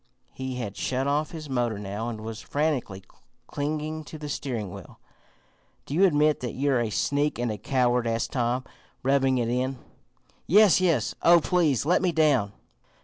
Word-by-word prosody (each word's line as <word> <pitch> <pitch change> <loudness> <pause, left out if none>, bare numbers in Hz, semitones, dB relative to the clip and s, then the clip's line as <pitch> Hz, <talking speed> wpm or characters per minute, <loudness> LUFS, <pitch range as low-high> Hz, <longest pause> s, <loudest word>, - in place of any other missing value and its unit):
He 130 -1 -5
had 115 -5 -5
shut 130 +1 -1
off 145 +2 0
his 155 -2 -8
motor 120 -5 -1
now, 105 +3 -4
and 110 -2 -6
was 110 0 -6
frantically 140 -10 -2 0.4
clinging 155 +3 -3
to 155 - -9
the 150 -1 -7
steering 115 -9 -4
wheel. - - -12 0.9
"Do - - -7
you 185 +6 +5
admit 150 -3 +3
that 125 -2 -4
you're 135 -2 +1
a 115 - -1
sneak 145 +7 0
and 120 -1 -1
a 105 - -5
coward?" 125 +1 +1
asked 115 0 -1
Tom, 125 0 0 0.4
"rubbing 135 0 +2
it 120 -2 0
in." 130 +2 -1 0.7
"Yes, 200 +1 +6
yes! 155 -11 +1
Oh, 170 0 +7
please 160 - +1
let 175 +3 +3
me 185 -2 +2
down!" 145 -10 +2
135 Hz, 170 wpm, -26 LUFS, 120-150 Hz, 0.9 s, Oh